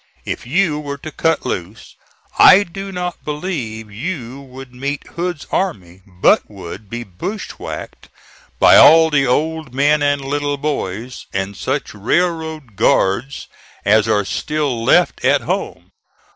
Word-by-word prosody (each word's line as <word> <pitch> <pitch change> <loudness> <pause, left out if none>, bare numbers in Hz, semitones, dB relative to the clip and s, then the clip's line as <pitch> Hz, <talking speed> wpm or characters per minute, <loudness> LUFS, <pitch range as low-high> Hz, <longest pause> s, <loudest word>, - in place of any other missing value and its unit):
If - - -5
you 160 +1 +1
were 140 -1 -5
to 155 +3 -8
cut 165 +1 0
loose, 95 +5 -5 0.4
I 190 +2 +8
do 195 +2 -8
not 180 -1 -5
believe 135 - -4
you 130 - -5
would 130 -1 -12
meet 140 +3 -4
Hood's 175 -3 -4
army, 95 - -2
but 90 -1 +2
would 100 0 -9
be 120 +2 -5
bushwhacked 120 - -7 0.5
by - - +7
all 160 0 +7
the 140 -2 +2
old 155 +1 -1
men 145 +2 +3
and 145 -1 +1
little 145 +1 -1
boys, 125 -5 -4
and 95 +1 -3
such - - -3
railroad 160 - -1
guards 110 +5 +1 0.4
as 105 +2 +4
are 105 -2 +2
still 145 0 -2
left - - +3
at - - +3
home. - - -4
140 Hz, 135 wpm, -18 LUFS, 110-160 Hz, 0.5 s, I